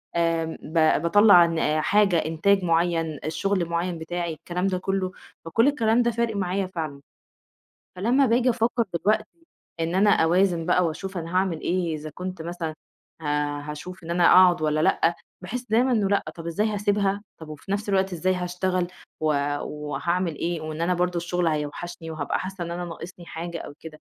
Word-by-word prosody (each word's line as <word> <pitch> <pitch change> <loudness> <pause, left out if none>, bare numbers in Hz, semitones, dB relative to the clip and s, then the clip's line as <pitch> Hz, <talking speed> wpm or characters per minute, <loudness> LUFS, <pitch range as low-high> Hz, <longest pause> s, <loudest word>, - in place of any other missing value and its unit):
آمم 165 -1 0
ب 160 -1 +2
باطلّع 180 +1 +7
ن 160 -2 0
حاجة 200 +1 +3
إنتاج 165 +5 +2
معيّن، 165 -3 +1
شغل 185 +3 0
معيّن 170 +1 -2
بتاعي 170 +1 -3
الكلام 180 +4 -3
ده 185 -1 0
كلّه، 190 0 -1 0.3
فكلّ 225 +10 +3
الكلام 235 -5 +3
ده 235 0 +2
فارق 230 -1 -1
معايا 190 0 -1
فعلًا، 155 -6 -5 1.0
فلمّا 245 +9 +3
باجي 245 +2 +3
أفكّر 235 0 +1
دلوقتي 215 +5 +2 0.6
إن 165 +1 -1
أنا 205 +2 +4
أوازن 175 -1 +3
بقى 180 0 +3
وأشوف 185 +4 -4
أنا 165 +1 -6
هاعمل 185 -4 +1
إيه، 175 -2 -1
إذا 155 0 -7
كنت 180 -2 -6
مثلًا 170 -1 -4 0.5
ه - - -10 0.4
هاشوف 150 +5 -8
إن 165 - -7
أنا 175 0 +3
أقعد 180 -2 +6
والّا 155 0 +1
لأ، 165 +2 +2 0.3
باحس 245 +7 -5
دايمًا 245 +4 +3
إنه 210 -4 +2
لأ 200 0 +1
طب 165 -1 -9
إزاي 205 +6 0
هاسيبها؟ 205 -1 0 0.2
طب 160 - -9
وفي 155 +5 -7
نفْس 205 +1 -2
الوقت 190 -1 +1
إزاي 185 +2 0
هاشتغل؟ 180 0 -1 0.3
و 155 - -1 0.4
وهاعمل 170 +3 -2
إيه 170 +1 -2
وإن 155 0 -6
أنا 175 +2 +1
برضه 180 0 0
الشغل 175 +1 -1
هيوحشني 165 +3 -4
وهابقى 155 -3 -2
حاسّة 185 -1 -5
إن 170 - -6
أنا 175 +1 -4
ناقصني 175 +1 -9
حاجة 170 +1 -6
أو - - -8
كده، 155 -2 -11
175 Hz, 175 wpm, -25 LUFS, 165-195 Hz, 1.0 s, باطلّع